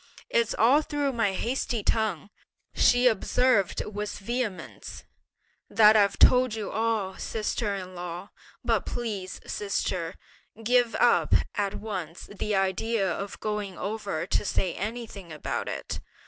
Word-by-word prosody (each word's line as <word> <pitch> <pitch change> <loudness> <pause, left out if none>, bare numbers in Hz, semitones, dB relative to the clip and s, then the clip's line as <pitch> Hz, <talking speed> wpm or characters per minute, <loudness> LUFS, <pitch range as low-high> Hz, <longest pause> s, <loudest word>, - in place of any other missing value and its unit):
"It's 485 -2 +2
all 260 +7 +5
through 290 -2 -1
my 225 -5 +1
hasty 235 +1 -1
tongue," 205 -5 0 0.4
she 245 +1 +4
observed 225 -3 +2
with 210 0 -4
vehemence, 230 -1 -4 0.7
"that 215 -1 +6
I've 200 -2 +4
told 250 -3 +5
you 215 -2 -4
all, 220 -3 -1
sister 215 -1 -2
in 185 -1 -7
law: 175 +2 -6 0.3
but - - +1
please, 205 -6 -4
sister, 185 -4 -2 0.5
give 245 0 +3
up - - +4 0.2
at 200 -1 -1
once 185 -6 -5
the 210 +1 -1
idea 195 +1 +1
of 200 +3 -5
going 210 -3 -3
over 200 -5 -3
to - - 0
say 185 -3 0
anything 215 -4 -6
about 150 - -3
it! - - -4
210 Hz, 130 wpm, -27 LUFS, 190-230 Hz, 0.7 s, that